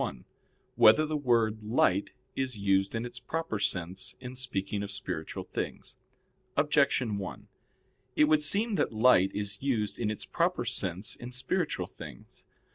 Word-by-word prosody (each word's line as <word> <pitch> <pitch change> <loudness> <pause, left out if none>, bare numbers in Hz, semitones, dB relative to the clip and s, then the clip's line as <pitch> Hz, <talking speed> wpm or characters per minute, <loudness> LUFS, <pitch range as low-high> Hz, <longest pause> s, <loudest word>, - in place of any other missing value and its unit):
1] - - -4 0.5
Whether 145 +9 +7
the 155 0 -2
Word 115 -6 +2
"Light" 105 -3 +2 0.3
Is 130 -4 -2
Used 95 0 +1
in 115 +1 -2
Its 120 - -6
Proper 160 -10 -3
Sense 95 0 -2
in 125 -1 -7
Speaking 105 -6 -3
of 100 - -4
Spiritual 90 -5 -3
Things? - - -5 0.6
Objection 140 -7 +2
1: 95 -2 -7 0.7
It - - +5
would 155 0 +4
seem 205 +9 +1
that - - 0
"light" 110 -4 +5
is 100 -1 -3
used 115 -7 -1
in 115 -3 0
its 110 - -3
proper 170 -6 0
sense 100 -2 -2
in 120 +1 -8
spiritual 125 +1 -1
things. - - -12
115 Hz, 150 wpm, -30 LUFS, 100-135 Hz, 0.7 s, Whether